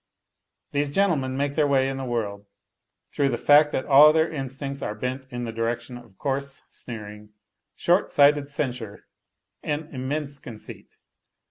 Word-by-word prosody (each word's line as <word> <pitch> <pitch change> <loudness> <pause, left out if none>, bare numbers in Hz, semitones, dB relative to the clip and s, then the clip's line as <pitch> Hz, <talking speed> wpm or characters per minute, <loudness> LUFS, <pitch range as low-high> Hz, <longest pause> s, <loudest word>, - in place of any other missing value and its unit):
These 145 0 0
gentlemen 140 -7 +1
make 140 0 -1
their 150 -1 +2
way 135 -2 +3
in 135 0 -3
the 135 - -4
world 105 -4 -3 0.6
through 140 -1 +1
the - - -1
fact 150 +1 +5
that 130 - -2
all 145 +2 +8
their 160 +1 +2
instincts 135 -1 -5
are 105 - -3
bent 130 +4 -4
in 120 -1 -5
the 115 - -4
direction 115 +2 -3
of 120 -6 -14
coarse 140 0 -3
sneering, 105 -2 -9 0.4
short - - +2
sighted 145 0 +4
censure 125 -7 -4 0.6
and 150 +1 -4
immense 140 +2 -4
conceit. 115 -5 -11
135 Hz, 150 wpm, -25 LUFS, 120-145 Hz, 0.6 s, all